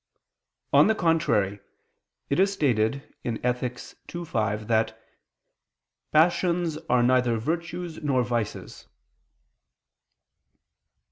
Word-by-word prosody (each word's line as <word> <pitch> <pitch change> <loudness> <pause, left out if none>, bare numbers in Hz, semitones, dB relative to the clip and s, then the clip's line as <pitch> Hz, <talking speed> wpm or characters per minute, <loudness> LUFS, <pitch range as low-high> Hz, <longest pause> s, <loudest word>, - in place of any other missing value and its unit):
On - - +7
the 220 - +3
contrary, 160 - +1 0.7
It 140 - +2
is 195 +1 +4
stated 140 - 0
in 115 -2 -2
Ethic. 125 0 -1 0.4
ii, 175 0 -4
5 110 -7 -2
that 110 -1 +1 1.1
"passions 170 0 +2
are 125 -1 +4
neither 125 -2 +3
virtues 170 +6 -4
nor 135 -4 +1
vices." 120 -3 -4
130 Hz, 90 wpm, -26 LUFS, 115-170 Hz, 1.1 s, On